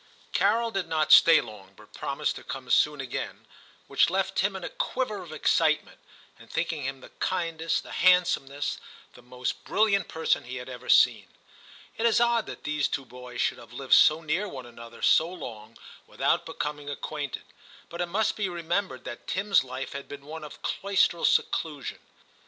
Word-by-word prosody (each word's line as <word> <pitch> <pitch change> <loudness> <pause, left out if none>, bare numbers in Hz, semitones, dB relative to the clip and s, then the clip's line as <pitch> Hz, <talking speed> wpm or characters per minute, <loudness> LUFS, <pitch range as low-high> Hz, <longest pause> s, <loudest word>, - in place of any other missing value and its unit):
Carol 225 +3 +2
did 195 -4 -2
not 155 -1 0
stay 165 - +8
long, 105 -3 -12
but - - -18
promised - - -2
to - - -10
come 135 -1 -7
soon 150 -1 +3
again, 130 -2 -5 0.4
which - - +3
left - - -1
Tim - - +1
in - - -6
a - - -4
quiver 260 - -2
of 170 -3 -10
excitement, 155 0 +1 0.4
and - - -16
thinking 155 -3 -2
him 135 0 -4
the - - -13
kindest, 165 -3 -1
the - - -11
handsomest, 170 -6 +2 0.3
the - - -15
most 125 +1 -4
brilliant 200 -3 +2
person 160 0 0
he 125 +1 -6
had 125 0 -7
ever 125 -1 -9
seen. - - +5 0.7
It 230 - +3
is 230 - +3
odd 235 -1 +2
that - - -8
these 150 -1 0
two 135 -3 -3
boys 125 0 -7
should - - 0
have 115 0 -14
lived 130 +1 -1
so 155 +2 +7
near 165 +6 -1
one 130 -9 -8
another 115 0 -12
so 160 - +5
long 115 -11 -9 0.3
without - - 0
becoming 150 -1 -4
acquainted; 145 0 -5 0.4
but 170 +1 -6
it 175 - 0
must 205 +5 0
be 200 -3 -1
remembered 175 -3 -2
that 120 - -8
Tim*s 200 -5 +2
life 130 +1 -6
had 140 0 -7
been 140 -1 -10
one 160 +1 -8
of 150 - -11
cloistral 195 -3 +1
seclusion. 150 -5 0
155 Hz, 180 wpm, -27 LUFS, 130-185 Hz, 0.7 s, stay